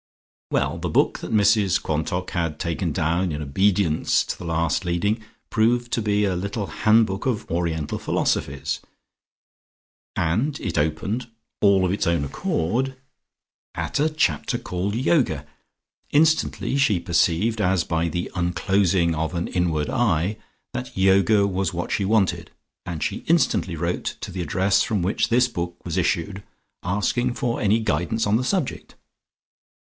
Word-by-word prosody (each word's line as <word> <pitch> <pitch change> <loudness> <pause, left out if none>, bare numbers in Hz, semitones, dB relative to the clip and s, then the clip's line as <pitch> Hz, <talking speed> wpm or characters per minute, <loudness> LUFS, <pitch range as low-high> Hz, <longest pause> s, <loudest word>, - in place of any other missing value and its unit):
Well, - - 0
the - - -3
book - - +2
that - - -7
Mrs 105 -3 +3
Quantock 85 +4 -2
had 85 -4 -2
taken 85 -2 -2
down 85 +3 0
in 75 0 -4
obedience 90 +2 +2
to - - -4
the - - -9
last 85 0 0
leading 100 +6 0 0.3
proved 120 +2 +1
to 115 - +1
be 105 -1 +1
a 95 -2 0
little 100 +3 -3
handbook 105 -1 +2
of 120 -5 -2
Oriental 85 -3 -2
Philosophies, 70 0 -1 1.3
and 110 - 0
it - - -3
opened, 80 +11 -1 0.3
"all 100 -2 +4
of 90 - +1
its 100 - -1
own 85 -4 +1
accord," 120 - -1 0.8
at - - -2
a 155 +2 +3
chapter 140 - 0
called 95 +3 -3
Yoga. 120 - +1 0.6
Instantly 155 -2 +2
she 110 -9 +3
perceived, 95 +6 +1
as 90 -3 +2
by 85 +1 -1
the 85 +1 -3
unclosing 90 0 +1
of 80 +3 -2
an 85 - -1
inward 85 -5 0
eye, 100 -6 +1 0.4
that 60 - -6
Yoga 100 +2 +4
was 95 -1 -1
what 85 - -3
she 100 - 0
wanted 100 -2 +1 0.4
and 85 -4 -4
she - - -1
instantly 105 - +2
wrote 85 +2 -2
to - - -6
the 90 - -4
address 95 +3 +2
from 105 -5 0
which 95 - 0
this 125 +2 +4
book 85 -7 -4
was 85 -2 -3
issued 95 +2 -1 0.4
asking 110 +6 0
for 120 -4 -1
any 105 +2 +3
guidance 105 +2 0
on 100 - +3
the 120 - +1
subject. 170 +1 -2
95 Hz, 150 wpm, -23 LUFS, 85-110 Hz, 1.3 s, all